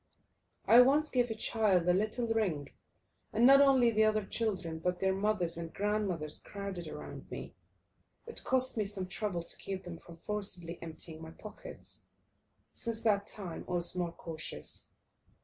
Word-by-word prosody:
I 240 Hz, +2 st, +9 dB
once 290 Hz, +4 st, +4 dB
gave 245 Hz, -2 st, +2 dB
a 225 Hz, -, -2 dB
child 210 Hz, -6 st, +2 dB
a 180 Hz, -, +6 dB
little 215 Hz, +5 st, 0 dB
ring, 195 Hz, -11 st, 0 dB, 0.6 s
and 230 Hz, +3 st, +4 dB
not 275 Hz, +2 st, +9 dB
only 265 Hz, -4 st, +6 dB
the 220 Hz, 0 st, +4 dB
other 215 Hz, -1 st, +2 dB
children, 190 Hz, -8 st, -2 dB
but 180 Hz, +2 st, -1 dB
their 190 Hz, 0 st, +2 dB
mothers 195 Hz, -4 st, 0 dB
and 165 Hz, -1 st, -5 dB
grandmothers, 195 Hz, -7 st, -1 dB
crowded 200 Hz, -4 st, -6 dB
round -, -, -8 dB
me. -, -, -6 dB, 0.7 s
It 465 Hz, -, -6 dB
cost 260 Hz, -2 st, +1 dB
me 215 Hz, -, +1 dB
some 195 Hz, -2 st, -3 dB
trouble 185 Hz, -2 st, -2 dB
to -, -, -8 dB
keep 190 Hz, -1 st, -5 dB
them 170 Hz, -2 st, -7 dB
from 170 Hz, -, -13 dB
forcibly 180 Hz, -3 st, -4 dB
emptying 160 Hz, 0 st, -7 dB
my 160 Hz, -, -7 dB
pockets. -, -, -9 dB, 0.7 s
Since 230 Hz, -2 st, -1 dB
that 205 Hz, -3 st, +3 dB
time 185 Hz, -6 st, -5 dB
I -, -, -2 dB
was 175 Hz, 0 st, +3 dB
more 175 Hz, -2 st, -1 dB
cautious. 160 Hz, -2 st, -6 dB
200 Hz, 165 wpm, -33 LUFS, 170-225 Hz, 0.7 s, I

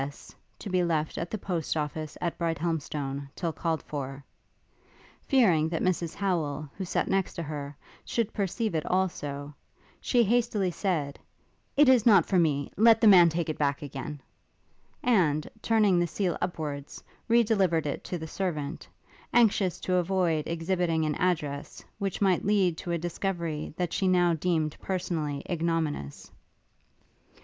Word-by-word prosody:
S., 140 Hz, +1 st, -9 dB, 0.2 s
to -, -, -8 dB
be 185 Hz, -2 st, +1 dB
left 160 Hz, -3 st, -1 dB
at 170 Hz, -, -3 dB
the 215 Hz, -, -3 dB
post 175 Hz, -5 st, -2 dB
office 155 Hz, 0 st, -4 dB
at 170 Hz, -, -2 dB
Brighthelmstone 150 Hz, -4 st, -2 dB
till 170 Hz, -3 st, -2 dB
called 165 Hz, -1 st, -2 dB
for," 135 Hz, -1 st, -6 dB, 1.0 s
fearing 180 Hz, -, +4 dB
that 165 Hz, -1 st, -2 dB
Mrs 175 Hz, -3 st, 0 dB
Howel, 155 Hz, -7 st, -1 dB
who 190 Hz, -, -4 dB
sat -, -, -1 dB
next 195 Hz, -1 st, 0 dB
to 170 Hz, -, -3 dB
her, 145 Hz, -2 st, -6 dB, 0.3 s
should 230 Hz, -2 st, -2 dB
perceive 210 Hz, +1 st, -1 dB
it 160 Hz, -2 st, 0 dB
also, 150 Hz, -6 st, -2 dB, 0.5 s
she 245 Hz, -2 st, +3 dB
hastily 220 Hz, -4 st, +1 dB
said, 160 Hz, -6 st, -2 dB, 0.6 s
'It 295 Hz, 0 st, +6 dB
is 255 Hz, -4 st, +6 dB
not 200 Hz, -8 st, +6 dB
for 185 Hz, -, +2 dB
me; 145 Hz, -4 st, +1 dB
let 225 Hz, +2 st, +6 dB
the -, -, +3 dB
man 180 Hz, -4 st, +8 dB
take 165 Hz, 0 st, -2 dB
it 155 Hz, -, -4 dB
back 140 Hz, -1 st, 0 dB
again;' 145 Hz, +1 st, -6 dB, 0.8 s
and, 160 Hz, -11 st, +2 dB
turning 210 Hz, -5 st, +3 dB
the 175 Hz, -, +1 dB
seal 180 Hz, +2 st, -1 dB
upwards, 150 Hz, -5 st, -4 dB, 0.2 s
re 235 Hz, 0 st, +5 dB
delivered 190 Hz, -8 st, +2 dB
it 145 Hz, -, -3 dB
to 180 Hz, -, -3 dB
the 160 Hz, -, -6 dB
servant; 160 Hz, -3 st, -4 dB, 0.5 s
anxious 205 Hz, -6 st, +3 dB
to 185 Hz, -1 st, +1 dB
avoid 175 Hz, -4 st, +1 dB
exhibiting 165 Hz, -1 st, 0 dB
an 155 Hz, -, 0 dB
address, 150 Hz, -5 st, -2 dB
which 195 Hz, -1 st, -3 dB
might 185 Hz, -3 st, +3 dB
lead 195 Hz, -4 st, +2 dB
to 175 Hz, -, -7 dB
a 170 Hz, -, +1 dB
discovery 170 Hz, -2 st, -3 dB
that 175 Hz, -2 st, -2 dB
she 190 Hz, -, +1 dB
now 175 Hz, -2 st, +4 dB
deemed 160 Hz, -2 st, 0 dB
personally 165 Hz, -6 st, -2 dB
ignominious. 165 Hz, -, -2 dB
170 Hz, 155 wpm, -28 LUFS, 150-190 Hz, 1.0 s, man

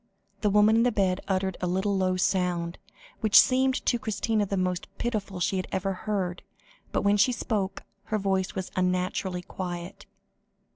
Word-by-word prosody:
The 210 Hz, -, +1 dB
woman 210 Hz, +2 st, +5 dB
in -, -, +4 dB
the 245 Hz, +1 st, +3 dB
bed 195 Hz, -3 st, +1 dB
uttered 190 Hz, -1 st, -1 dB
a 180 Hz, -, 0 dB
little 190 Hz, +3 st, 0 dB
low 185 Hz, -1 st, +1 dB
sound, 180 Hz, -2 st, 0 dB, 0.4 s
which 215 Hz, -2 st, +7 dB
seemed 260 Hz, 0 st, +3 dB
to 240 Hz, -, +2 dB
Christina 215 Hz, 0 st, 0 dB
the 195 Hz, -, -2 dB
most 180 Hz, -1 st, -1 dB
pitiful 210 Hz, -5 st, -3 dB
she 190 Hz, +2 st, 0 dB
had 185 Hz, -, -3 dB
ever 195 Hz, 0 st, -1 dB
heard, 185 Hz, -3 st, -3 dB, 0.5 s
but -, -, 0 dB
when 200 Hz, +1 st, +3 dB
she 205 Hz, +5 st, +4 dB
spoke, 205 Hz, -4 st, -2 dB, 0.2 s
her 215 Hz, -, -1 dB
voice 190 Hz, -2 st, -1 dB
was 190 Hz, -1 st, -4 dB
unnaturally 180 Hz, 0 st, -1 dB
quiet. 175 Hz, 0 st, -6 dB
190 Hz, 165 wpm, -27 LUFS, 185-210 Hz, 0.5 s, which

